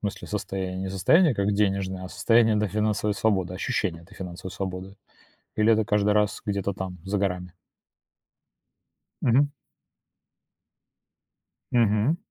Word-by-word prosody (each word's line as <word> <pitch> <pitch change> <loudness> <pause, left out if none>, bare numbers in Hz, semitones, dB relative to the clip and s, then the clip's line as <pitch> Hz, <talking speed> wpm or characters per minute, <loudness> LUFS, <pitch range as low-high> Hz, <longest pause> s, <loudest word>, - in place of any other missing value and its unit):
смысле 100 -2 -4
состояние, 95 -2 -3
не 95 - -3
состояние 145 - +4
как 100 +1 +1
денежное, 95 -2 0
а - - -6
состояние, 110 +4 +3
да, 105 - +1
финансовой 105 0 0
свободы, 95 -5 0
ощущение 95 -6 -2
этой 85 - -17
финансовой 90 0 -7
свободы? 95 +1 -5 0.6
Или 110 +1 +4
это 110 -1 +2
каждый 105 0 +2
раз 105 -1 +1
где-то 100 -2 -1
там, 95 -1 -6
за 100 +1 -1
горами? 90 -2 -2 1.7
Мгм. 135 +4 +4 2.2
Мгм. 115 +6 +3
100 Hz, 120 wpm, -26 LUFS, 95-105 Hz, 2.2 s, состояние